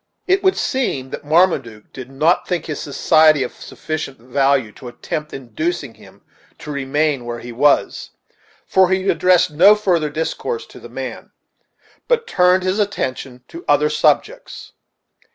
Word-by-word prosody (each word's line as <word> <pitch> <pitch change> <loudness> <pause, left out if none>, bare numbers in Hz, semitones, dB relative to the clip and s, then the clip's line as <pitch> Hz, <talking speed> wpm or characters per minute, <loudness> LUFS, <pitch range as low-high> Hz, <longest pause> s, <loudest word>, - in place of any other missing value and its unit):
It 380 +1 +2
would 380 0 +2
seem 140 - -2
that - - -7
Marmaduke 145 - 0
did 130 -1 -9
not 155 +6 +1
think 175 -3 -2
his 155 -3 -5
society 155 0 +3
of 125 - -6
sufficient 155 -4 -6
value 135 -1 0
to 125 - -12
attempt 150 +5 -6
inducing 135 +2 -4
him - - -19 0.3
to 150 - -8
remain 140 0 -1
where 120 0 -5
he 120 +1 -9
was, 140 +5 +1 0.6
for 190 -1 +3
he 190 +1 0
addressed 180 -3 +3
no 185 +8 +6
further 175 -7 0
discourse 160 - -4
to - - -15
the - - -12
man, - - -7 0.8
but 475 -2 +1
turned 180 - +2
his 185 +3 -1
attention 130 -10 -3
to 335 +1 -10
other 450 - +3
subjects. - - -1
155 Hz, 150 wpm, -19 LUFS, 135-185 Hz, 0.8 s, no